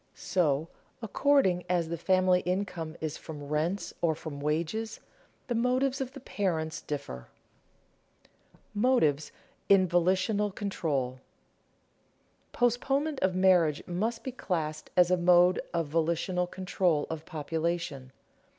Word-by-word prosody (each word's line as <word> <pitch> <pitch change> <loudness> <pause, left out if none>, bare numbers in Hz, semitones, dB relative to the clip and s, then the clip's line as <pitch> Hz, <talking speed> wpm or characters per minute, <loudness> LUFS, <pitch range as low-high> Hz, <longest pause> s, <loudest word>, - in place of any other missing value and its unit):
So, 160 -4 0 0.4
according 225 -6 +2
as 175 -3 +1
the 170 - -2
family 185 +1 +3
income 180 -3 -3
is 155 -1 -3
from 150 -2 -9
rents 160 +6 -1
or 165 -2 +2
from 150 -2 -7
wages, 165 +9 -2 0.5
the 245 - -2
motives 255 +3 +1
of 260 -1 -4
the - - -9
parents 165 -9 -2
differ. 140 - -6 1.0
[Sidenote: - - -31
Motives 205 - +2 0.4
in 190 -2 +6
volitional 185 +4 +2
control] 150 -11 -2 1.3
Postponement 270 +5 +1
of 185 -1 +1
marriage 180 -5 +3
must 220 +6 -2
be 260 - -4
classed 160 -10 -3
as 180 0 +5
a 180 - +4
mode 180 +1 +5
of 170 -1 0
volitional 170 +3 0
control 180 -4 0
of 160 -1 -5
population. 160 -4 -3
180 Hz, 120 wpm, -29 LUFS, 160-200 Hz, 1.3 s, in